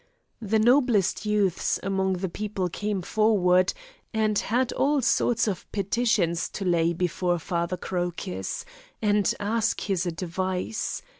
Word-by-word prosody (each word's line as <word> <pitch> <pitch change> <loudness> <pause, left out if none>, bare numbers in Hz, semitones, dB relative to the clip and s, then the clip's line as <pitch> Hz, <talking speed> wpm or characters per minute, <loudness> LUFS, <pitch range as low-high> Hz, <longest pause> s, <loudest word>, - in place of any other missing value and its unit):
The 220 0 +1
noblest 230 -4 +3
youths 205 -4 +1
among 190 0 0
the 185 +1 -2
people 195 0 -3
came 205 +1 -3
forward, 185 -4 +3 0.4
and 215 -2 +2
had 245 +3 0
all 290 +1 +2
sorts 230 0 +2
of 190 -4 -4
petitions 200 -4 +1
to 195 - -4
lay 170 -2 +2
before 175 0 0
Father 170 +2 -2
Crocus, 175 - -4 0.3
and 205 -2 +2
ask 215 +2 0
his 190 -3 -1
advice. 185 +4 -3
195 Hz, 125 wpm, -26 LUFS, 180-215 Hz, 0.4 s, noblest